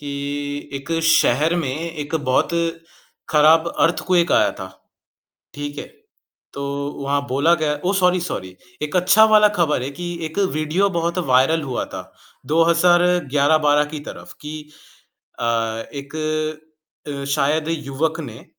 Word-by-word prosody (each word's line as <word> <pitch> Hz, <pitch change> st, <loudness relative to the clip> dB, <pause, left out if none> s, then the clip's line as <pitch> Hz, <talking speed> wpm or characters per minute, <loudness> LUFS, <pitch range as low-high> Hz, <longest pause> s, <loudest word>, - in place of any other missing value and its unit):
कि 145 Hz, -1 st, -6 dB, 0.6 s
एक 140 Hz, +4 st, -5 dB
शहर 160 Hz, 0 st, +3 dB
में 130 Hz, -, -2 dB
एक 160 Hz, -1 st, -5 dB
बहुत 130 Hz, -5 st, +1 dB, 0.8 s
खराब 160 Hz, +2 st, +5 dB
अर्थक्वेक 175 Hz, +1 st, +2 dB
आया -, -, +4 dB
था, 95 Hz, -, -6 dB, 0.9 s
ठीक 145 Hz, 0 st, -6 dB
है? -, -, -6 dB, 0.7 s
तो 140 Hz, -, -5 dB, 0.4 s
वहाँ 140 Hz, +1 st, 0 dB
बोला 140 Hz, +6 st, +2 dB
गया 150 Hz, -1 st, +1 dB
ओह! 195 Hz, +2 st, +1 dB
सॉरी, 180 Hz, -1 st, +2 dB
सॉरी 95 Hz, -, -5 dB, 0.3 s
एक 150 Hz, +3 st, -2 dB
अच्छा 185 Hz, +5 st, +5 dB
वाला 210 Hz, -1 st, +6 dB
खबर 150 Hz, -6 st, +1 dB
है 135 Hz, -, -4 dB
कि 175 Hz, +4 st, -6 dB
एक 160 Hz, +5 st, -7 dB
वीडियो 155 Hz, +6 st, +1 dB
बहुत 170 Hz, +1 st, -1 dB
वायरल 135 Hz, +5 st, +3 dB
हुआ 130 Hz, -4 st, -3 dB
था, -, -, -9 dB, 0.3 s
2011-12 160 Hz, -3 st, +3 dB
की 150 Hz, -, -5 dB
तरफ़ -, -, -10 dB
कि 150 Hz, 0 st, -8 dB, 0.7 s
अ, -, -, -4 dB, 0.5 s
एक 140 Hz, +1 st, -8 dB, 0.9 s
अ, 140 Hz, -1 st, -5 dB
शायद 145 Hz, +2 st, 0 dB
युवक 150 Hz, -1 st, -2 dB
ने -, -, -10 dB
155 Hz, 130 wpm, -20 LUFS, 140-170 Hz, 0.9 s, वाला